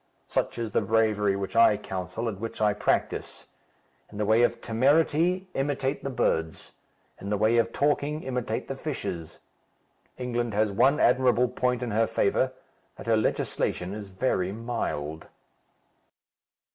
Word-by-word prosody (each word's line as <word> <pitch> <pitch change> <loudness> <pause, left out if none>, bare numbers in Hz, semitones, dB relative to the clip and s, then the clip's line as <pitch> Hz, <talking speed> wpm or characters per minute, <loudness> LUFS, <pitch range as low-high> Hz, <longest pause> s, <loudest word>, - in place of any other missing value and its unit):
Such - - -1
is 115 -2 -3
the - - +2
bravery 105 -1 +2
which 100 +1 -4
I 115 -2 +6
counsel 95 +3 -4
and 100 -4 -4
which 115 +1 -6
I 105 -1 +3
practise. 105 - -2 0.6
In 105 - -10
the 105 - 0
way 110 +3 +4
of 120 - +2
temerity, 160 +9 +2
imitate 135 0 -1
the 140 - -2
birds; 80 -10 -1 0.5
in 100 - -6
the 105 - +1
way 110 +3 +3
of 115 0 +2
talking, 145 +2 0
imitate 125 -2 -3
the - - -3
fishes. 80 -2 -5 0.8
England 120 -3 -2
has 105 0 +2
one 130 +8 +3
admirable 125 -1 +3
point 125 0 -1
in 120 - -3
her 110 +2 +2
favour, 130 +6 +1 0.4
that - - -10
her 115 -1 +3
legislation 95 -3 -1
is 105 -1 -7
very 95 -2 0
mild." 100 -9 -4
115 Hz, 145 wpm, -27 LUFS, 105-125 Hz, 0.8 s, I